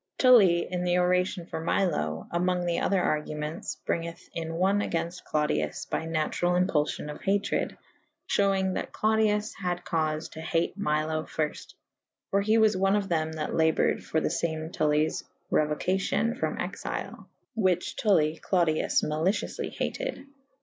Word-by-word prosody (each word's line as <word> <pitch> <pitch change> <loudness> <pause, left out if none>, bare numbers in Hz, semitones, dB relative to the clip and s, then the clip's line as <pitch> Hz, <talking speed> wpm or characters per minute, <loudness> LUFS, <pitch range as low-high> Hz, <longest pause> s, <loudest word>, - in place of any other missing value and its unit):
Tully 200 -10 +6
in 180 -1 -2
the 180 0 +2
oracion 180 0 +1
for 160 - -5
Milo 155 - 0
/ - - -26
amonge 175 0 0
other 195 0 +2
argume«tes 150 -1 -2
bryng 170 0 -1
eth 170 - -10
in 165 0 -4
one 190 +4 +2
againft 170 -2 -2
Clodius 75 - -1
by - - -3
naturall 165 +2 0
impulfion 150 -4 0
of - - -10
hatred 200 +1 0 0.3
/ - - -16
Ihew 200 -1 +4
ynge 190 0 0
that - - -4
Clodius 215 0 +1
had 180 -3 -3
caufe 155 0 -1
to 160 - -8
hate 165 +1 0
Milo 155 -4 0
fyrft 155 -1 -4 0.3
/ - - -64
for 200 - +3
he 215 +2 +3
was 220 -2 +4
one 195 +1 +3
of 200 -2 -1
them 160 -2 0
that 155 -1 -3
laboured 160 -1 +2
for 160 - 0
the - - -1
fame 160 -1 -2
Tullyes 155 0 +1 0.3
reuocacyon 190 +9 +1
from 260 - -2
exyle - - -5
/ - - -48
whiche 185 -5 +1
Tulli 160 -7 +2
Clodius 170 -4 +2
malicioufly 160 +7 -1
hated. - - -4
170 Hz, 155 wpm, -28 LUFS, 155-195 Hz, 0.3 s, Tully